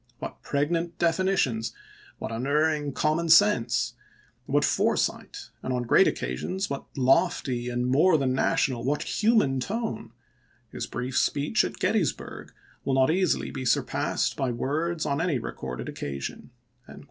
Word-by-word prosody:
What - - -7
pregnant 165 +4 -1
defi 170 +1 +1
nitions, 130 -13 0 0.4
what 110 - -5
unerring 145 +5 0
common 155 +4 0
sense, 165 - +4 0.5
what - - +2
fore - - +2
sight, - - -3
and - - -4
on 125 -1 -1
great 120 - +5
occasions 180 - -3
what 140 - -4
lofty, 125 -1 +2
and 125 0 -1
more 155 +7 +4
than 135 -3 0
national, 130 -2 +1
what 145 +4 0
human 210 - +2
tone! 220 - -4 0.6
His - - -5
brief 125 +2 -4
speech 145 +1 +2
at - - -4
Gettysburg - - -1 0.3
will 135 - 0
not 130 +3 +4
easily 185 -1 +1
be 135 - -5
surpassed 125 - 0
by 135 - -1
words 155 +7 -1
on 140 +2 0
any 165 -5 +1
recorded 60 - -6
occasion." 70 -1 -6
140 Hz, 140 wpm, -26 LUFS, 125-165 Hz, 0.6 s, great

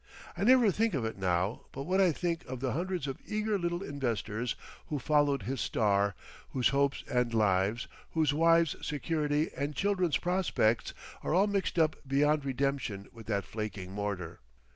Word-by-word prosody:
I - - -2
never 245 -2 +6
think 220 0 +1
of 125 -5 -1
it 110 -3 -4
now 95 +3 0
but 135 - -5
what 185 +5 +2
I 185 -3 +5
think 170 +1 -2
of 130 -1 -6
the 130 0 -1
hundreds 180 +1 -2
of 135 -2 -4
eager 215 -1 -1
little 175 +1 -2
investors 120 - -2 0.3
who 150 - -2
followed 145 -1 +2
his 130 +4 -3
"star," 100 -2 +1 0.4
whose 130 -2 +3
hopes 140 0 +1
and 125 -1 +1
lives, 105 +1 +2 0.3
whose 155 -3 +2
wives' 165 0 +4
security 150 0 0
and 145 +1 -3
children's 185 -6 +1
prospects 175 -11 +1 0.3
are - - 0
all 190 +3 +5
mixed 200 -3 -1
up 160 -1 +3
beyond 145 +2 +2
redemption 135 -7 -2
with 115 -2 -12
that 100 -3 0
flaking 105 -4 -5
mortar.... 95 -4 -4
140 Hz, 165 wpm, -31 LUFS, 110-170 Hz, 0.4 s, never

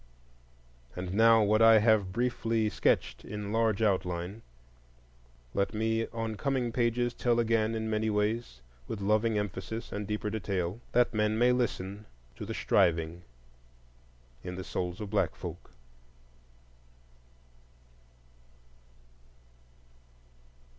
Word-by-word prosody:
And 90 0 -5
now 115 +1 +6
what 105 +2 +3
I 115 0 +8
have 105 -3 +3
briefly 115 -1 0
sketched - - 0
in 105 0 -6
large 115 -2 +2
outline 90 0 -1 1.1
let 100 +2 -1
me 110 +1 0
on 115 -1 -4
coming 130 -3 -1
pages 120 0 0
tell 120 -1 +1
again 115 -1 +1
in 110 0 -2
many 110 0 0
ways, 105 - -1 0.3
with 110 - -4
loving 105 +2 +1
emphasis 105 +2 -4
and 105 -1 -4
deeper 105 0 -2
detail, 95 -2 -2
that 120 0 +3
men 105 0 +1
may 120 +2 +4
listen 105 -4 -2 0.3
to - - -7
the - - -4
striving 80 +1 +1 1.2
in 90 - -5
the 95 - -5
souls 90 +1 -4
of 105 -1 -6
black 105 - +1
folk. - - -8
110 Hz, 115 wpm, -30 LUFS, 100-115 Hz, 1.2 s, I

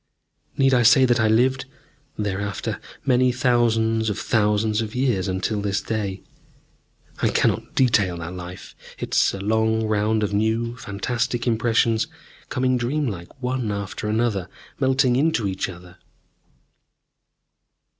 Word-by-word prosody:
Need 135 -1 +4
I 125 - +4
say 120 +3 +6
that 120 -1 +2
I 110 - +3
lived, 130 +5 +2 0.5
thereafter, 100 -1 -3 0.3
many 130 -1 +3
thousands 115 -3 +2
of 105 - -2
thousands 105 0 +1
of 110 0 -5
years, 125 -7 +1
until 95 +3 -1
this 100 -1 0
day? 100 -4 -3 1.0
I - - +3
cannot - - 0
detail 105 -9 +2
that 85 +1 -6
life. 90 0 -9 0.2
It - - -6
is - - +4
a - - -6
long 110 +2 +1
round 110 0 +1
of 105 0 -1
new, 110 +3 0
fantastic 120 +3 -2
impressions, 115 -1 +2 0.4
coming 130 0 +1
dream 140 +5 -1
like, 95 +7 -9
one 125 -3 -1
after 100 +1 -4
another, 110 -4 0 0.3
melting 130 -2 +3
into 145 -7 +1
each 95 0 -2
other. 90 0 -12
110 Hz, 135 wpm, -23 LUFS, 100-125 Hz, 1.0 s, say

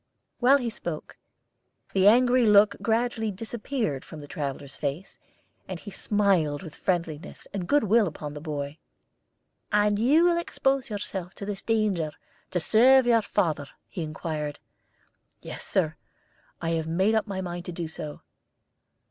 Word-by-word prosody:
While 260 +3 +6
he 245 -4 -3
spoke, 170 -7 -6 0.8
the 195 0 +4
angry 245 +2 +5
look 205 0 +6
gradually 225 -1 0
disappeared 220 - -3
from 160 - -10
the 145 -1 -9
traveller's 140 -1 -5
face, 150 +6 -4 0.5
and 185 -2 -5
he 205 - -9
smiled 190 -7 +1
with 160 -4 -9
friendliness 170 -2 -3
and 185 -3 -3
goodwill 230 -6 +4
upon 150 -2 -6
the 150 - -7
boy. 145 -1 -4 0.9
"And 210 0 +3
you 285 +9 +5
will 345 -1 +4
expose 270 -6 0
yourself 190 -3 -4
to 200 - -5
this 200 -1 -4
danger 205 -9 0 0.4
to 180 - 0
serve 250 +8 +6
your 235 -2 +4
father?" 160 -9 -1 0.2
he 115 - -5
inquired. 155 -1 -4 0.9
"Yes, - - -4
Sir; - - +1 0.7
I 165 - 0
have 160 -1 -1
made 190 +6 +2
up 220 0 +1
my 195 -2 -3
mind 175 -1 -5
to 180 - -5
do 170 -1 -4
so." 155 -2 -7
195 Hz, 150 wpm, -27 LUFS, 160-225 Hz, 0.9 s, While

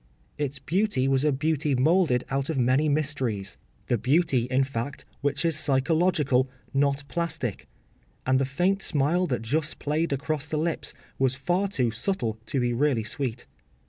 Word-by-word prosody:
Its 140 -1 -2
beauty 150 -1 0
was 135 0 +2
a 150 - +3
beauty 150 0 0
moulded 145 -1 +3
out 135 +2 -1
of 160 - -1
many 130 +5 +3
mysteries—the 130 -7 -2
beauty, 135 - +2
in 130 +1 +3
fact, 135 +1 -4 0.2
which 145 +3 0
is 165 -2 +3
psychological, 145 -2 +2 0.2
not 140 +1 +1
plastic—and 140 - -3
the - - +2
faint 175 +9 0
smile 160 +5 +2
that 125 -6 -2
just 150 +7 0
played 155 +3 -1
across 150 +1 -2
the 155 - -2
lips 165 +1 -2 0.2
was 130 -1 +2
far 175 +9 0
too 130 - 0
subtle 115 - -2
to 135 - 0
be 120 -1 +1
really 130 -2 +1
sweet. 125 +1 -3
140 Hz, 150 wpm, -26 LUFS, 130-155 Hz, 0.2 s, a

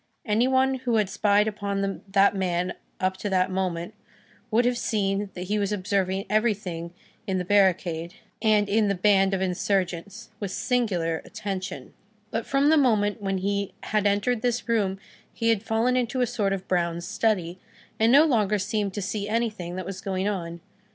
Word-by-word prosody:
Any 225 +2 +2
one 265 0 +2
who 245 -2 0
had 210 -3 +1
spied 205 0 +3
upon 200 -2 -2
that 195 +1 +4
man 180 -1 -1 0.3
up 185 0 0
to 205 - -3
that 185 0 +1
moment, 180 -2 -2 0.6
would 235 +2 +3
have 245 -1 +1
seen 200 -1 -1
that 180 - -4
he 210 +3 -1
was 200 0 -1
observing 195 -1 -1
everything 205 -6 -1 0.4
in 190 -1 0
the 180 - -2
barricade 180 -3 +2 0.3
and 215 -2 +3
in 210 +1 +2
the 200 - +1
band 195 0 +3
of 190 - -3
insurgents, 190 +3 -2
with 200 - -3
singular 185 -8 0
attention; 190 -9 -6 0.4
but, 225 - -3
from 275 +2 +3
the 315 - +5
moment 215 -6 +2
when 195 -1 -1
he 200 +1 -2
had 210 -1 +1
entered 205 +4 +1
this 240 0 -1
room, 205 -5 +1 0.3
he 230 - -1
had 225 -3 +2
fallen 225 +3 +1
into 250 +1 0
a - - +4
sort 215 -4 -1
of 195 -1 -3
brown 170 -2 0
study, 185 -3 -1 0.4
and 225 +1 +4
no 290 +4 +7
longer 215 -8 +2
seemed 205 -1 -2
to 205 - -2
see 205 +1 -3
anything 215 -6 -2
that 185 - -4
was 190 -1 -6
going 190 0 -2
on. 170 -4 -4
200 Hz, 180 wpm, -26 LUFS, 185-220 Hz, 0.6 s, no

